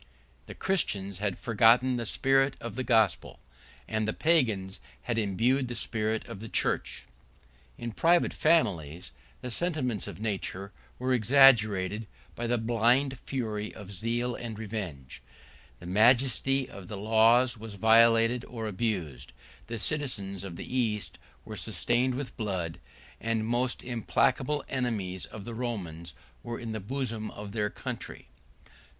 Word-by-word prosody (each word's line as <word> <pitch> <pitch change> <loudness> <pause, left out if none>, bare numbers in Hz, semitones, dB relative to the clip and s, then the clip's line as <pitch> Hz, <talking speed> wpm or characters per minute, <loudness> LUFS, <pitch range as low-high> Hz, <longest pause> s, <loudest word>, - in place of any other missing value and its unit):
The - - -8
Christians 100 - 0
had 100 -2 -1
forgotten 115 +3 +4
the 115 -2 -2
spirit 135 +2 +2
of 115 -2 -6
the 130 - -2
gospel; 110 -7 +2 0.5
and 110 -1 -1
the 110 - 0
Pagans 110 - +1 0.2
had 120 -2 -1
imbibed 115 +6 +1
the 120 - -5
spirit 110 -1 -1
of 95 - -8
the 115 +1 -8
church. - - -1 0.7
In 120 - -5
private 170 +9 +3
families, 90 - +1 0.3
the 125 - -5
sentiments 130 - -1
of - - -8
nature 100 -2 -3 0.3
were 130 0 0
extinguished 110 -5 +4 0.3
by 120 - -3
the 120 +1 +1
blind 120 +4 +2
fury 110 -5 -3
of 100 -2 -10
zeal 120 +5 -1
and 115 -2 -6
revenge: 95 - -6 0.6
the - - -12
majesty 125 +6 +3
of 100 -6 -11
the 105 - -6
laws 115 +4 +4
was 110 -2 -9
violated 115 +2 +5
or 115 -2 -6
abused; 90 - -3 0.3
the 115 - -4
cities 105 -8 -3
of 95 -3 -7
the 125 - -7
East 110 -5 -1 0.3
were - - -7
stained 125 +2 0
with 135 0 -5
blood; 95 -7 -3 0.4
and 115 -1 -1
the - - -3
most 120 +2 -1
implacable 130 +4 0
enemies 105 -8 -2
of 105 -3 -9
the 120 - -6
Romans 90 - -5 0.3
were 120 0 -5
in 115 -2 -5
the 110 - -3
bosom 115 0 -3
of 105 0 -8
their 105 -1 -1
country. - - -7
115 Hz, 145 wpm, -29 LUFS, 100-125 Hz, 0.7 s, violated